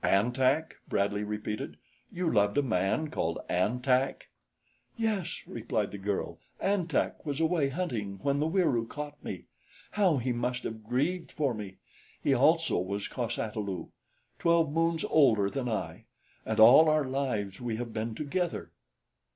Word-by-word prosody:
"An 105 Hz, +5 st, +3 dB
Tak!" 135 Hz, +5 st, +1 dB
Bradley 100 Hz, +1 st, 0 dB
repeated. 105 Hz, 0 st, -4 dB, 0.3 s
"You 180 Hz, 0 st, -2 dB
loved 105 Hz, -1 st, +3 dB
a 145 Hz, -, +4 dB
man 110 Hz, -, 0 dB
called 85 Hz, -, -1 dB
An 110 Hz, +8 st, 0 dB
Tak?" 130 Hz, +1 st, +1 dB, 0.7 s
"Yes," 220 Hz, -6 st, -1 dB
replied 110 Hz, -2 st, -2 dB
the 100 Hz, -, -7 dB
girl. 100 Hz, 0 st, -3 dB, 0.2 s
"An 195 Hz, -3 st, +1 dB
Tak 165 Hz, -, -1 dB
was 145 Hz, -1 st, -3 dB
away, 160 Hz, -3 st, +2 dB
hunting, 120 Hz, -, -3 dB
when 140 Hz, 0 st, +1 dB
the 150 Hz, -, +1 dB
Wieroo 160 Hz, -10 st, +1 dB
caught 150 Hz, +2 st, -7 dB
me. -, -, -6 dB, 0.5 s
How 190 Hz, -8 st, +3 dB
he 125 Hz, 0 st, -1 dB
must 125 Hz, +1 st, -2 dB
have 110 Hz, -1 st, -5 dB
grieved 145 Hz, +11 st, -1 dB
for 140 Hz, -5 st, 0 dB
me! 105 Hz, -3 st, -7 dB, 0.4 s
He -, -, +2 dB
also -, -, +3 dB
was 100 Hz, +2 st, -3 dB
cos 120 Hz, -2 st, -3 dB
ata 110 Hz, 0 st, -3 dB
lu, 95 Hz, -5 st, -4 dB, 0.5 s
twelve 170 Hz, -3 st, +3 dB
moons 165 Hz, +1 st, +1 dB
older 110 Hz, -10 st, +4 dB
than 130 Hz, -3 st, -2 dB
I, 110 Hz, -, -4 dB, 0.4 s
and 110 Hz, 0 st, -1 dB
all 130 Hz, +8 st, +9 dB
our 155 Hz, -1 st, +3 dB
lives 125 Hz, -8 st, -2 dB
we 120 Hz, -2 st, -2 dB
have 120 Hz, 0 st, -5 dB
been 110 Hz, 0 st, -3 dB
together." 170 Hz, +5 st, -2 dB
125 Hz, 160 wpm, -30 LUFS, 105-155 Hz, 0.7 s, all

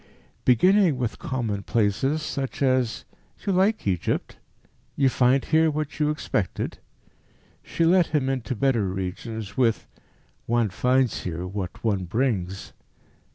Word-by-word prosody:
Beginning 180 Hz, -, +4 dB
with 120 Hz, -3 st, -3 dB
commonplaces, 115 Hz, +4 st, -1 dB
such 140 Hz, -2 st, -3 dB
as 130 Hz, -3 st, +1 dB, 0.4 s
"You 195 Hz, -, +1 dB
like 195 Hz, +4 st, +2 dB
Egypt? 90 Hz, -4 st, -1 dB, 0.6 s
You 135 Hz, -2 st, +3 dB
find 130 Hz, +1 st, +2 dB
here 160 Hz, 0 st, +3 dB
what 155 Hz, 0 st, -4 dB
you 150 Hz, -1 st, +2 dB
expected?" 105 Hz, -, -2 dB, 0.8 s
she 165 Hz, -, -1 dB
led 180 Hz, 0 st, +4 dB
him 150 Hz, -4 st, 0 dB
into 130 Hz, -3 st, -2 dB
better 120 Hz, -4 st, +1 dB
regions 95 Hz, +3 st, -5 dB
with 115 Hz, -4 st, +2 dB, 0.6 s
"One 115 Hz, -2 st, +2 dB
finds 125 Hz, +2 st, +1 dB
here 90 Hz, 0 st, -4 dB
what 95 Hz, -1 st, -6 dB
one 100 Hz, -5 st, 0 dB
brings." 95 Hz, -3 st, -2 dB
125 Hz, 120 wpm, -25 LUFS, 100-145 Hz, 0.8 s, Beginning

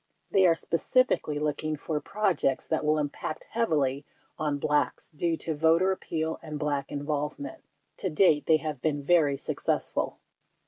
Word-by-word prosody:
They 190 Hz, -1 st, +5 dB
are 165 Hz, -, +5 dB
specifically 170 Hz, -, +1 dB
looking 155 Hz, +1 st, -1 dB
for 150 Hz, +1 st, -3 dB
pro 205 Hz, -2 st, +1 dB
j 150 Hz, -, 0 dB
ects 135 Hz, -, -1 dB
that 160 Hz, -1 st, 0 dB
will 155 Hz, +1 st, +3 dB
impact 150 Hz, +1 st, -3 dB
heavily 150 Hz, -, +1 dB, 0.4 s
on 150 Hz, -2 st, 0 dB
Blacks 150 Hz, +3 st, 0 dB
due 165 Hz, +1 st, -1 dB
to 160 Hz, -, -3 dB
voter 165 Hz, +5 st, +3 dB
appeal 160 Hz, -3 st, -3 dB
and 155 Hz, -2 st, -6 dB
Black 145 Hz, -2 st, -2 dB
involvement. 150 Hz, -, -3 dB, 0.3 s
To 190 Hz, -, -2 dB
date, 155 Hz, -2 st, +3 dB
they 160 Hz, -, +6 dB
have 155 Hz, -4 st, -5 dB
been 145 Hz, -2 st, 0 dB
very 150 Hz, -3 st, +3 dB
success -, -, -1 dB
ful. -, -, -2 dB
155 Hz, 165 wpm, -28 LUFS, 145-170 Hz, 0.4 s, they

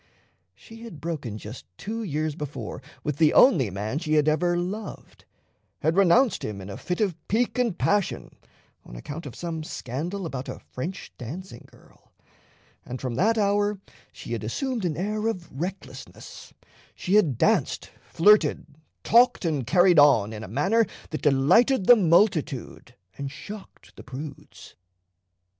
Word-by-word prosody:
She 225 Hz, -, -14 dB
had 225 Hz, -10 st, -10 dB
broken 145 Hz, -9 st, -4 dB
just 110 Hz, +1 st, -9 dB
two 225 Hz, +3 st, -5 dB
years 155 Hz, -6 st, -2 dB
before 135 Hz, -6 st, -6 dB, 0.2 s
with 150 Hz, -2 st, -2 dB
the 155 Hz, -1 st, +4 dB
only 150 Hz, -, +6 dB
man 105 Hz, +8 st, -3 dB
she 155 Hz, -2 st, -2 dB
had 150 Hz, 0 st, +3 dB
ever 175 Hz, +3 st, +2 dB
loved, 195 Hz, +4 st, -6 dB, 0.6 s
had 160 Hz, +3 st, +1 dB
renounced 200 Hz, +6 st, +4 dB
him 105 Hz, -2 st, -4 dB
in 95 Hz, +1 st, -8 dB
a -, -, -7 dB
fit 180 Hz, -, -4 dB
of 195 Hz, -6 st, +1 dB
pique 240 Hz, +4 st, 0 dB
and 235 Hz, -8 st, 0 dB
passion 205 Hz, -2 st, 0 dB, 0.5 s
on -, -, -12 dB
account 145 Hz, -, -7 dB
of 130 Hz, -, -9 dB
some 165 Hz, -2 st, -5 dB
scandal 165 Hz, +8 st, -5 dB
about 135 Hz, -5 st, -5 dB
a -, -, -6 dB
French 170 Hz, +9 st, -7 dB
dancing 165 Hz, +11 st, -8 dB
girl; -, -, -23 dB, 0.7 s
and 125 Hz, +1 st, -7 dB
from 130 Hz, -2 st, -4 dB
that 220 Hz, -, +2 dB
hour 205 Hz, -1 st, +1 dB, 0.3 s
she -, -, -10 dB
had -, -, -3 dB
assumed 260 Hz, -8 st, -2 dB
an 155 Hz, -4 st, -2 dB
air 210 Hz, +4 st, -2 dB
of 185 Hz, -6 st, -4 dB
recklessness: 180 Hz, +8 st, -8 dB, 0.4 s
she 180 Hz, -, -3 dB
had 170 Hz, -, +4 dB
danced, -, -, +1 dB, 0.2 s
flirted, 175 Hz, -3 st, +4 dB, 0.4 s
talked, 240 Hz, -4 st, +4 dB
and 145 Hz, -7 st, -1 dB
carried 175 Hz, +1 st, +5 dB
on 115 Hz, -8 st, +5 dB
in 110 Hz, 0 st, -7 dB
a -, -, -7 dB
manner 150 Hz, -, +2 dB, 0.3 s
that 155 Hz, -, -4 dB
delighted 185 Hz, -, +4 dB
the 245 Hz, -, +9 dB
multitude 170 Hz, -, +1 dB, 0.2 s
and 140 Hz, -1 st, -3 dB
shocked 200 Hz, +8 st, -11 dB
the -, -, -11 dB
prudes. 145 Hz, +3 st, -10 dB
165 Hz, 150 wpm, -25 LUFS, 135-205 Hz, 0.7 s, the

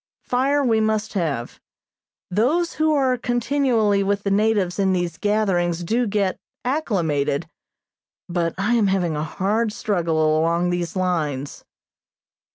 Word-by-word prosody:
Fire 275 Hz, +3 st, +1 dB
we 225 Hz, -4 st, +2 dB
must 215 Hz, 0 st, 0 dB
have. 150 Hz, -, -2 dB, 0.7 s
Those 290 Hz, -, +1 dB
who 315 Hz, 0 st, +1 dB
are 265 Hz, -4 st, +2 dB
continually 240 Hz, -4 st, +1 dB
with 200 Hz, +1 st, 0 dB
the 200 Hz, -, -1 dB
natives 205 Hz, -3 st, +1 dB
in 190 Hz, -1 st, +2 dB
these 175 Hz, -3 st, -2 dB
gatherings 180 Hz, -5 st, +1 dB
do 235 Hz, +7 st, 0 dB
get 200 Hz, -2 st, 0 dB, 0.3 s
"acclimated," 170 Hz, -, 0 dB, 0.8 s
but 170 Hz, -2 st, -1 dB
I 205 Hz, +5 st, +1 dB
am 225 Hz, -4 st, +3 dB
having 180 Hz, -4 st, 0 dB
a 150 Hz, -, -2 dB
hard 210 Hz, +7 st, -1 dB
struggle 165 Hz, -7 st, +1 dB
along 170 Hz, +2 st, +1 dB
these 175 Hz, 0 st, -3 dB
lines. 155 Hz, -7 st, -2 dB
200 Hz, 130 wpm, -22 LUFS, 170-225 Hz, 0.8 s, am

